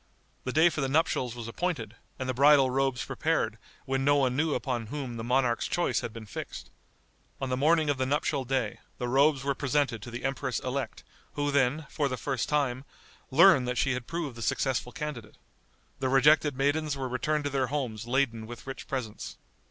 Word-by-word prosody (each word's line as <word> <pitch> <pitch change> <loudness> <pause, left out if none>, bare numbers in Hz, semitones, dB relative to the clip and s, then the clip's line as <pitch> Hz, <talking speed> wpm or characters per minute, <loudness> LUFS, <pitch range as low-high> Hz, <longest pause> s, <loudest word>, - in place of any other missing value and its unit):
The 130 - -1
day 160 +5 +5
for 155 - -3
the 135 - 0
nuptials 135 -5 +1
was 120 -2 -6
appointed, 115 - -3 0.2
and 130 - -4
the 130 - 0
bridal 140 0 +6
robes 135 -1 0
prepared 115 -9 -1 0.3
when 135 0 0
no 145 +1 +4
one 130 -3 +2
knew 155 +2 +1
upon 120 -5 -2
whom 130 -1 -5
the 115 - -5
monarch's 125 0 +1
choice 175 - +1
had 115 - -5
been 110 0 -9
fixed. 100 - -7 0.7
On 135 -1 -3
the 125 - +1
morning 155 +4 +3
of 145 -2 0
the 130 - +1
nuptial 140 -1 0
day 130 -4 -1 0.2
the 125 - -3
robes 135 +2 +3
were 140 0 +1
presented 135 -4 0
to 120 - -8
the 120 +2 -6
empress 135 -2 -1
elect, 135 0 -4 0.3
who 145 0 -1
then, 140 +2 +2
for 145 - -1
the 130 - -3
first 130 0 -2
time, 135 -4 0 0.5
learned 145 -2 +6
that 125 0 -2
she 135 - +2
had 125 -1 -3
proved 165 -7 -4
the 115 - -8
successful 125 +2 0
candidate. 125 -8 -6 0.6
The 130 - 0
rejected 145 +1 +4
maidens 145 +1 +1
were 135 -1 -2
returned 150 +4 -1
to 145 - -2
their 135 -2 +1
homes 120 -5 -3
laden 120 -4 0
with 120 0 -9
rich 135 0 -7
presents. 125 -6 -5
135 Hz, 200 wpm, -29 LUFS, 125-145 Hz, 0.7 s, bridal